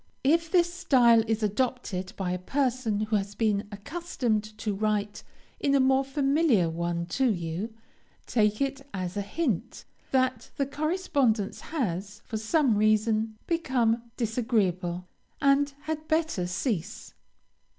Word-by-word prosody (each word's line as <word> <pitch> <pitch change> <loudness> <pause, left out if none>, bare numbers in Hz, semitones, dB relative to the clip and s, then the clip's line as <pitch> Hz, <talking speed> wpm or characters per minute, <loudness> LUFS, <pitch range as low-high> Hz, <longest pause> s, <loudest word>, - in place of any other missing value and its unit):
If 330 +4 +3
this 345 -2 +3
style 250 -11 +5
is 220 0 0
adopted 210 -4 -1
by 185 -2 -2
a 180 - -2
person 250 -1 0
who 215 0 +1
has 200 +1 -4
been 210 -3 +1
accustomed 235 - -2
to 215 -1 -2
write 210 0 -1 0.4
in 280 0 +2
a - - +5
more 265 +1 +4
familiar 275 - +2
one 170 +1 -2
to 265 -3 +3
you, 175 +3 -3 0.5
take 215 -1 +1
it 275 0 -1
as 185 0 -3
a 205 - -1
hint, 220 - -2 0.2
that 260 -1 +1
the 275 - +1
correspondence 280 - 0
has, 205 - -3
for 220 - -4
some 235 +1 +2
reason, 215 +1 +2
become 240 -8 0
disagreeable, 200 -7 0 0.3
and 280 0 +3
had 310 0 -4
better 315 - 0
cease. 180 - -3
225 Hz, 130 wpm, -28 LUFS, 205-275 Hz, 0.5 s, style